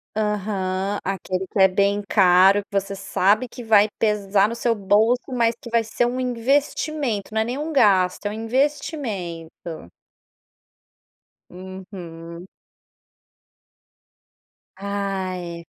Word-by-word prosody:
Aham, 200 -2 -1
aquele 190 0 -3
que 200 - -7
é 190 0 +6
bem 200 +1 +1
caro, 195 +1 +5
que 200 - -1
você 195 0 -7
sabe 200 +4 +1
que 245 0 -10
vai 215 -2 +5
pesar 205 -1 +2
no 235 - -4
seu 235 0 0
bolso, 220 +6 +2
mas 235 -2 +1
que 235 - -9
vai 230 -1 +1
ser 240 +2 0
um 250 +2 -2
investimento, 255 -2 -1
não 220 - +1
é - - 0
nem 245 +3 -3
um 310 +2 -4
gasto, 195 -8 +3
é 205 - +1
um - - -5
investimento. 215 - -3 1.6
Uhum. 180 -2 -10 2.3
Ai. 190 -4 -4
200 Hz, 120 wpm, -22 LUFS, 185-230 Hz, 2.3 s, é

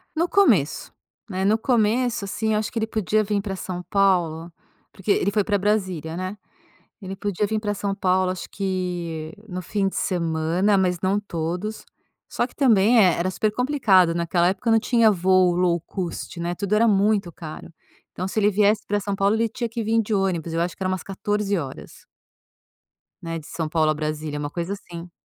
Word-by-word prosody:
No 335 +2 +1
começo, 230 - +2 0.4
né, 190 0 -2
no 215 +2 +4
começo 235 -1 +1
assim, 220 +3 -2
eu 210 - +2
acho 215 - -2
que 235 - -7
ele 220 - +1
podia 215 0 +1
vir 205 -1 -1
pra 195 -2 -4
São 180 -1 -5
Paulo, 175 -4 +1 0.4
porque 195 +1 -9
ele 200 0 +3
foi 210 0 +2
pra 205 -2 +1
Brasília, 185 -6 -1
né, 185 +3 -4 0.6
ele 190 0 -6
podia 205 +1 -1
vir 215 +1 -1
pra 205 -1 -1
São 200 0 -2
Paulo 185 -1 +1
acho 185 - -8
que 175 -5 -3 0.2
no 185 0 -5
fim 195 +2 -1
de - - -8
semana, 170 +3 +1
mas 180 -2 +1
não 195 +2 +1
todos. 180 +3 -4 0.4
Só 245 - -1
que - - -21
também 230 -4 +4
eh, 185 -5 +6
era 180 +2 0
super 215 +2 0
complicado 215 - +3
naquela 170 +1 +1
época 225 +4 0
não 225 - +5
tinha 230 -2 +4
voo 185 -1 +3
low 175 -1 +2
cost 170 -1 -6
né, 170 +1 -2
tudo 200 +1 -1
era 230 +2 +4
muito 200 -2 +2
caro, 155 +1 -9 0.4
então 185 - -4
se 215 +3 -1
ele 205 - +4
viesse 205 +1 +3
pra 205 0 +1
São 200 0 -3
Paulo 200 +2 +2
ele 230 0 +1
tinha 235 +1 -4
que 230 -1 -4
vir 225 +1 +2
de 215 - -5
ônibus, 175 -4 -1
eu 165 - -1
acho 175 +1 -2
que - - -7
era 185 - 0
umas 185 -1 -2
14 205 +1 -1
horas. 140 -6 -7 1.2
Né, 165 0 -4
de 150 - -14
São 160 -2 -4
Paulo 155 -1 +2
a - - +1
Brasília 155 0 -4
é - - -4
uma 145 0 -3
coisa 175 +5 -3
assim. 175 -3 -9
195 Hz, 200 wpm, -23 LUFS, 175-210 Hz, 1.2 s, eh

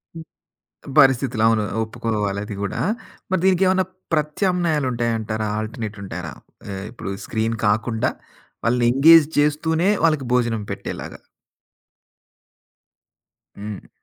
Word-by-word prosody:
హ్మ్. 165 - -7 0.8
పరిస్థితులు 130 -4 +4
అవును. 110 -1 +2 0.2
ఒప్పుకోవాలది 105 -2 -3
గూడా. 100 - -3 0.5
మరి 185 - +1
దీనికేమన్నా 185 0 +3 0.3
ప్రత్యామ్నాయాలు 155 -1 0
ఉంటాయంటారా? 110 -2 -1
ఆల్టర్నేట్ 110 -1 -5
ఉంటారా? 85 -5 -6 0.4
ఆహ్, 95 0 -5
ఇప్పుడు 115 -5 -7 0.2
స్క్రీన్ 115 0 -1
కాకుండా, 110 +2 +1 0.5
వాళ్ళని 120 0 +2
ఎంగేజ్ 155 +3 +7
చేస్తూనే 160 +4 +2 0.2
వాళ్ళకి 155 -5 +2
భోజనం 115 -3 +1
పెట్టేలాగా. - - -6 2.4
హ్మ్. 105 0 -8
120 Hz, 95 wpm, -22 LUFS, 110-155 Hz, 2.4 s, ఎంగేజ్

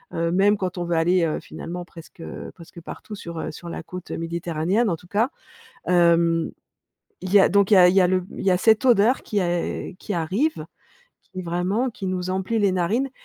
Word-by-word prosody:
Heu, 165 0 0
même 200 +3 +3
quand 185 -2 -3
on - - -1
veut 170 0 -1
aller, 175 +2 +3
heu, 155 - -2
finalement 175 +1 -7
presque, 165 -1 -14
heu, - - -8
presque 170 0 -13
partout 210 - -9
sur, 170 -5 -7
heu, - - -4
sur 170 +2 -9
la 165 - -6
côte 180 +2 -9
méditerranéenne, 170 +6 -1
en 170 - 0
tout 175 +2 -18
cas. 215 +7 +1 0.6
Hem, 170 -2 +3 0.7
il 185 +1 -5
y 205 - +8
a - - +4
donc 200 +2 +3
il - - +7
y - - +8
a 180 -1 +8
il 180 - 0
y 195 - +6
a 180 - +4
le 185 +1 +2
m 180 - -9
il - - -5
y 190 - +4
a 180 - +3
cette 220 +5 +3
odeur 240 0 +4
qui 205 -2 -1
a 175 -1 -2
qui 210 - -5
arrive 195 - -1 0.6
qui, 185 -1 -8
vraiment 180 +9 -1
qui 195 -4 -7
nous 185 0 -2
emplit 190 +4 -1
les 200 -3 +2
narines 210 +10 0
180 Hz, 225 wpm, -23 LUFS, 170-200 Hz, 0.7 s, y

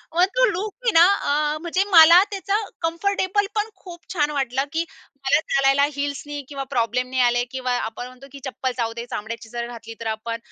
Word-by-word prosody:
मग 355 - +5
तो - - +5
लूक 400 +4 -4
मी 470 - +4
ना 335 +1 +8 0.5
अ, - - -4
म्हणजे 360 +3 0
मला 340 +2 +9
त्याचा 395 +1 -1 0.2
कम्फर्टेबल 390 +4 0
पण 425 +1 0
खूप 345 -2 -12
छान 300 -3 +1
वाटलं, 270 -2 -1
की 330 +1 0 0.3
मला 270 +2 +2
चालायला 275 +1 +4
हील्सनी 285 +1 -4
किंवा 275 -1 -4
प्रॉब्लेम 250 +1 0
नाही 260 0 0
आले 245 0 +3
किंवा 255 -1 -2
आपण 225 +3 -5
म्हणतो, 255 +2 -14
की 280 - -10
चप्पल 255 +2 -3
चावते 235 0 -3
चामड्याची 225 +1 -6
जर 235 0 -4
घातली 230 -1 -9
तर 225 - -3
आपण. 230 +1 -4
275 Hz, 190 wpm, -23 LUFS, 245-340 Hz, 0.5 s, मला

